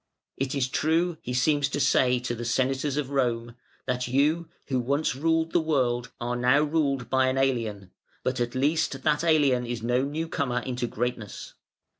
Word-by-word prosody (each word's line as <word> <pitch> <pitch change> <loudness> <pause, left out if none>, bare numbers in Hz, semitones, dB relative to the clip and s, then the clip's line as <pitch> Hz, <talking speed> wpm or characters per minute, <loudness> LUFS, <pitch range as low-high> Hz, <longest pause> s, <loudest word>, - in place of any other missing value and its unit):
"It 135 +1 -2
is 135 -2 +1
true" 160 +4 0
he 125 - -5
seems 145 +2 +2
to 145 - -2
say 125 -2 +3
to 125 -1 -3
the 120 0 -5
Senators 130 +4 0
of 140 -2 -2
Rome, 120 -3 0 0.3
"that 125 -1 -1
you, 150 +6 +1 0.2
who 130 -2 +1
once 140 +4 0
ruled 160 +3 +1
the - - +3
world, 125 -6 0
are 120 0 -2
now 125 +4 +3
ruled 145 -4 0
by 130 0 +2
an 130 0 0
alien; 115 -8 -1 0.3
but 130 0 -1
at 120 +1 -2
least 150 +5 0
that 150 0 +2
alien 145 -7 +3
is 120 -2 -4
no 120 +2 +2
new 155 +4 -3
comer 125 -6 -1
into 125 -1 -3
greatness. 120 -3 -4
130 Hz, 180 wpm, -26 LUFS, 125-150 Hz, 0.3 s, say